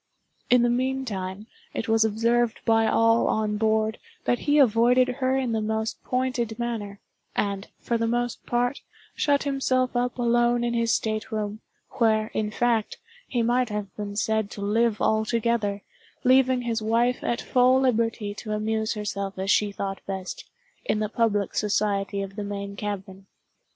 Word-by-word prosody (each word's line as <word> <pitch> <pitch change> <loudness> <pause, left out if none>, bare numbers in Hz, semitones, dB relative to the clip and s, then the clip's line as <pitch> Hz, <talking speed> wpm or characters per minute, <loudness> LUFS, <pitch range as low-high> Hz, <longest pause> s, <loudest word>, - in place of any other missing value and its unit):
In 245 -1 +5
the 240 - +3
meantime, 235 -7 -2 0.3
it 225 - -3
was 225 0 +4
observed 230 +2 +1
by 225 -1 +4
all 230 0 +3
on 215 -1 0
board, 220 0 +1 0.3
that 245 - +1
he 290 0 +2
avoided 250 0 +5
her 260 +1 0
in 260 -3 -1
the 220 -1 0
most 220 +1 -2
pointed 250 -3 -1
manner, 220 -4 -4 0.4
and, 200 0 -1
for 235 -1 -1
the 230 - +1
most 240 +1 -1
part, 245 +2 0 0.3
shut 285 -1 +2
himself 260 -2 0
up 245 +1 0
alone 240 0 +2
in 240 0 0
his 230 -1 +1
state 215 -1 -1
room, 210 -1 -3 0.4
where, 220 -2 +2
in 215 -1 -1
fact, 230 0 0 0.3
he 240 -2 0
might 245 +1 +2
have 210 -2 -5
been 205 -1 -5
said 220 -1 0
to 205 - -8
live 215 +2 +1
altogether, 220 -2 0 0.4
leaving 255 0 +4
his 230 -2 -1
wife 235 +3 +1
at 235 - 0
full 255 +1 +3
liberty 225 -4 0
to 215 +1 -5
amuse 220 +1 -1
herself 200 -2 -4
as 190 +2 0
she 210 -1 +3
thought 195 -1 -4
best, 190 -1 -6 0.3
in - - 0
the 215 -1 -1
public 215 -4 0
society 200 -1 0
of 195 0 -8
the 210 - -4
main 200 0 -5
cabin. 195 -2 -6
225 Hz, 160 wpm, -25 LUFS, 210-240 Hz, 0.4 s, In